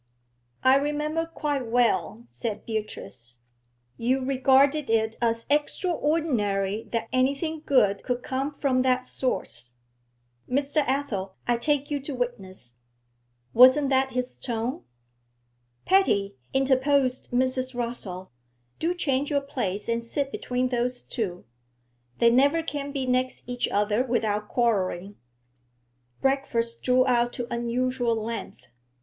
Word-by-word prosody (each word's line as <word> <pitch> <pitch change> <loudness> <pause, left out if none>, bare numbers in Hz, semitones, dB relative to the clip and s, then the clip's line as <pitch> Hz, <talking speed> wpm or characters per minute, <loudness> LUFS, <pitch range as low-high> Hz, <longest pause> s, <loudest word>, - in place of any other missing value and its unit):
'I 260 +1 +6
remember 300 +3 -1
quite 290 -6 -2
well,' 235 -1 +1
said 215 -3 -4
Beatrice; 125 - -6 0.6
'you 255 +3 +1
regarded 270 +1 +3
it 220 0 +1
as 230 -1 0
extraordinary 290 - 0
that 230 -1 -1
anything 280 +5 0
good 205 -10 +3
could 250 -1 -3
come 270 +2 -2
from 265 -3 +1
that 255 0 +2
source, 120 - -3 0.8
Mr. 280 +3 -1
Athel, 230 -9 -2
I 240 - +3
take 290 +3 0
you 290 - 0
to 275 0 -6
witness, 190 - -5 0.8
wasn't 260 +4 +7
that 265 0 +2
his 250 0 -2
tone?' 235 +1 -3 1.0
'Patty,' 220 - +3 0.2
interposed 265 0 +2
Mrs. 255 +1 0
Rossall, 220 -7 -5 0.5
'do 345 +2 0
change 280 -4 0
your 285 -2 +1
place 240 -8 -3
and 230 0 -1
sit 275 +4 -2
between 250 -1 -1
those 245 0 -1
two; 180 -6 -4 0.7
they 235 0 +5
never 280 +6 +4
can 285 -2 -4
be 275 -2 -2
next 255 0 0
each 245 0 -1
other 210 +3 +1
without 215 -4 -1
quarrelling.' 200 -5 0 1.0
Breakfast 235 -4 0
drew 255 0 +3
out 240 -2 +2
to 245 - -4
unusual 240 0 0
length. 225 +1 -5
250 Hz, 120 wpm, -26 LUFS, 230-275 Hz, 1.0 s, wasn't